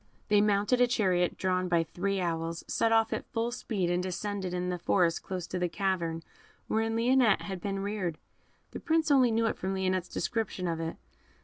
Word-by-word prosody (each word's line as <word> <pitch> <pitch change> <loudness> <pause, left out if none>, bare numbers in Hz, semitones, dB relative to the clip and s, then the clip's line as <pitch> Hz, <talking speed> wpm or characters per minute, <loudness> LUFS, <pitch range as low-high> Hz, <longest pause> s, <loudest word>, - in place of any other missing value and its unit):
They 210 -1 +5
mounted 210 +4 +2
a 245 - +6
chariot 185 -7 +1
drawn 185 -1 0
by 170 -2 +2
three 195 +4 -2
owls, 165 -1 -2
set 225 - +1
off 225 0 +3
at - - -5
full 230 +1 -1
speed, 195 -7 -2
and 175 0 +1
descended 185 +1 -3
in 180 0 -2
the 180 -1 -2
forest 170 -1 +2
close 185 -2 -5
to 180 - -4
the 180 -1 0
cavern 170 -3 -1 0.4
wherein 225 +1 0
Lionette 240 -2 +4
had 190 -3 -5
been 195 0 -2
reared. 195 -5 -2 0.5
The - - -6
Prince 320 -2 +1
only 260 -3 +5
knew 230 0 +1
it 225 - -1
from 190 +1 -2
Lionette's 185 -1 -1
description 215 -5 -2
of 165 -1 -2
it. 165 0 -3
190 Hz, 195 wpm, -30 LUFS, 180-225 Hz, 0.5 s, a